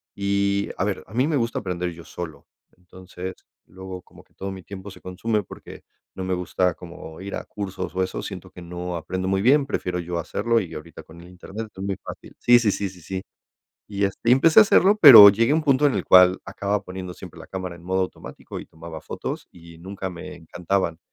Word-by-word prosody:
Y 100 Hz, 0 st, 0 dB
a -, -, 0 dB
ver, 100 Hz, 0 st, -2 dB
a -, -, -15 dB
mí 130 Hz, +4 st, +2 dB
me 155 Hz, -, 0 dB
gusta 115 Hz, -4 st, -1 dB
aprender 90 Hz, -3 st, -3 dB
yo 85 Hz, 0 st, -11 dB
solo, 85 Hz, -4 st, -8 dB, 0.3 s
entonces, 95 Hz, +1 st, -9 dB, 0.3 s
luego 95 Hz, 0 st, -9 dB
como -, -, -18 dB
que -, -, -35 dB
todo 95 Hz, 0 st, -6 dB
mi 95 Hz, -1 st, -8 dB
tiempo 100 Hz, +1 st, -9 dB
se -, -, -13 dB
consume, 105 Hz, +4 st, -2 dB
porque -, -, -12 dB, 0.3 s
no 95 Hz, -, -5 dB
me 95 Hz, -, -1 dB
gusta 90 Hz, 0 st, 0 dB
como 85 Hz, -2 st, -11 dB
ir 100 Hz, +1 st, -7 dB
a -, -, -6 dB
cursos 95 Hz, -4 st, -6 dB
o 95 Hz, -, +1 dB
eso, 95 Hz, -, -4 dB
siento 95 Hz, -2 st, -8 dB
que 90 Hz, -, -12 dB
no 90 Hz, +1 st, -5 dB
aprendo 95 Hz, +2 st, -4 dB
muy 95 Hz, 0 st, +1 dB
bien, 135 Hz, +6 st, +4 dB
prefiero 90 Hz, -9 st, -3 dB
yo 85 Hz, 0 st, -3 dB
hacerlo, 115 Hz, +7 st, 0 dB
y 90 Hz, -6 st, -6 dB
ahorita 75 Hz, +1 st, -9 dB
con 85 Hz, +1 st, -15 dB
el 85 Hz, -, -14 dB
internet 95 Hz, +5 st, -8 dB
es 95 Hz, -, -7 dB
muy 100 Hz, -1 st, -2 dB
fácil -, -, -10 dB
sí, 120 Hz, 0 st, +6 dB
sí, 110 Hz, -4 st, +2 dB
sí, 100 Hz, 0 st, -2 dB
sí, 90 Hz, -1 st, -15 dB
sí, 95 Hz, +3 st, -5 dB, 0.6 s
y 100 Hz, -1 st, -3 dB
este, 100 Hz, +3 st, -2 dB
y -, -, +8 dB
empecé 155 Hz, +8 st, +6 dB
a -, -, +10 dB
hacerlo, 200 Hz, 0 st, +4 dB
pero 115 Hz, -9 st, +12 dB
llegué 115 Hz, +6 st, +2 dB
a -, -, +3 dB
un 160 Hz, -, 0 dB
punto 140 Hz, 0 st, +3 dB
en 140 Hz, -, +1 dB
el 95 Hz, -, -1 dB
cual 90 Hz, 0 st, +7 dB
acababa 100 Hz, +1 st, -2 dB
poniendo 90 Hz, -1 st, -7 dB
siempre 90 Hz, -1 st, -12 dB
la -, -, -11 dB
cámara 95 Hz, -2 st, -5 dB
en 85 Hz, -, -15 dB
modo 95 Hz, +1 st, 0 dB
automático, 95 Hz, -, -7 dB
y -, -, -9 dB
tomaba 80 Hz, 0 st, -10 dB
fotos, -, -, -6 dB
y 85 Hz, -1 st, -15 dB
nunca 95 Hz, +2 st, -6 dB
me 90 Hz, +1 st, -9 dB
encantaban, 85 Hz, 0 st, -2 dB
95 Hz, 225 wpm, -23 LUFS, 90-100 Hz, 0.6 s, pero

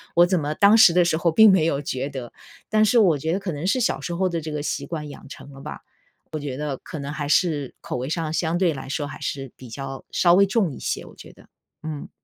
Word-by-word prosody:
我 175 Hz, -, +7 dB
怎 180 Hz, 0 st, +1 dB
么 150 Hz, +1 st, -2 dB
当 205 Hz, +6 st, +5 dB
时 205 Hz, -, +8 dB
的 180 Hz, 0 st, +5 dB
时 170 Hz, -, +1 dB
候 170 Hz, 0 st, +1 dB
并 220 Hz, +5 st, +7 dB
没 190 Hz, -4 st, +4 dB
有 145 Hz, -3 st, 0 dB
觉 135 Hz, 0 st, -3 dB
得， 130 Hz, -4 st, -8 dB, 0.4 s
但 215 Hz, 0 st, +3 dB
是 230 Hz, +3 st, +4 dB
我 175 Hz, -8 st, +4 dB
觉 160 Hz, +4 st, -2 dB
得 195 Hz, -, 0 dB
可 190 Hz, -3 st, -4 dB
能 145 Hz, +4 st, -5 dB
是 205 Hz, +7 st, +2 dB
小 240 Hz, -, 0 dB
时 175 Hz, -, -4 dB
候 185 Hz, +2 st, +1 dB
的 170 Hz, -2 st, -3 dB
这 155 Hz, 0 st, -6 dB
个 150 Hz, -1 st, -3 dB
习 145 Hz, -1 st, -3 dB
惯 150 Hz, -1 st, -5 dB
养 -, -, -12 dB
成 145 Hz, -, -11 dB
了 135 Hz, -, -12 dB
吧。 -, -, -7 dB, 0.5 s
我 155 Hz, -, -2 dB
觉 140 Hz, -3 st, -5 dB
得 145 Hz, -2 st, -3 dB
可 155 Hz, -, -7 dB
能 140 Hz, +1 st, -5 dB
还 150 Hz, -1 st, -4 dB
是， 155 Hz, -4 st, +1 dB
口 -, -, -5 dB
味 130 Hz, +3 st, -4 dB
上 160 Hz, -1 st, -2 dB
相 165 Hz, 0 st, 0 dB
对 175 Hz, -3 st, +2 dB
来 135 Hz, -1 st, -8 dB
说 145 Hz, 0 st, -2 dB
还 -, -, -9 dB
是 135 Hz, -2 st, -4 dB
比 130 Hz, -, -12 dB
较 135 Hz, +2 st, -7 dB
稍 175 Hz, -1 st, +4 dB
微 200 Hz, +2 st, +6 dB
重 195 Hz, -, 0 dB
一 -, -, -9 dB
些， -, -, -3 dB
我 -, -, -14 dB
觉 -, -, -13 dB
得， -, -, -20 dB, 0.4 s
嗯。 155 Hz, -2 st, -6 dB
155 Hz, 295 characters per minute, -23 LUFS, 140-180 Hz, 0.5 s, 时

